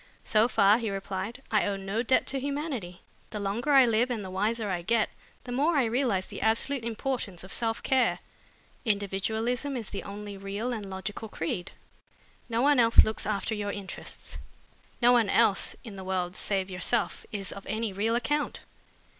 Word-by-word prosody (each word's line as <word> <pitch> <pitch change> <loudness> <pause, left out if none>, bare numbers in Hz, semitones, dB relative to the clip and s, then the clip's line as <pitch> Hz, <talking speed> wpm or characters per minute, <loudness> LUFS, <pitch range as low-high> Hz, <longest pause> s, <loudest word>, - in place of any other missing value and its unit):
"So 215 +1 +4
far," 205 -1 +5
he 225 -3 -2
replied, 195 +5 -4
"I 215 -2 +3
owe 200 - 0
no 195 +3 -2
debt 255 +2 +3
to 270 - -1
humanity. 275 - -4 0.3
The 210 - -5
longer 210 +8 -1
I 270 -2 +8
live 235 +2 +2
and 225 -5 -2
the 185 - -7
wiser 215 +3 0
I 175 -2 -1
get, 225 +4 +1 0.3
the 245 - -7
more 295 +6 +2
I 275 - +5
realize 225 -5 +1
the - - -8
absolute 230 +4 +2
importance 230 -5 -3
of 190 - -6
self 225 -1 -1
care. 260 -3 +3 0.7
Individualism 220 +6 -1
is 225 -4 -6
the 200 - -3
only 205 0 -7
real 200 +5 -3
and 210 -4 -5
logical 205 +3 -5
creed. 175 0 -3 0.8
No 230 +1 +1
one 285 -1 +5
else 230 -1 +8
looks 220 -2 -2
after 215 +1 -1
your 205 -1 -2
interests. 200 -2 -6 0.6
No 240 - +8
one 235 -4 +4
else 195 0 +3
in 215 -5 -9
the 190 - -6
world 185 -1 -2
save 195 -2 -1
yourself 190 +2 -1
is 200 -3 -3
of 200 - -9
any 220 0 -2
real 220 +4 +1
account." 290 +5 -1
220 Hz, 180 wpm, -28 LUFS, 195-240 Hz, 0.8 s, I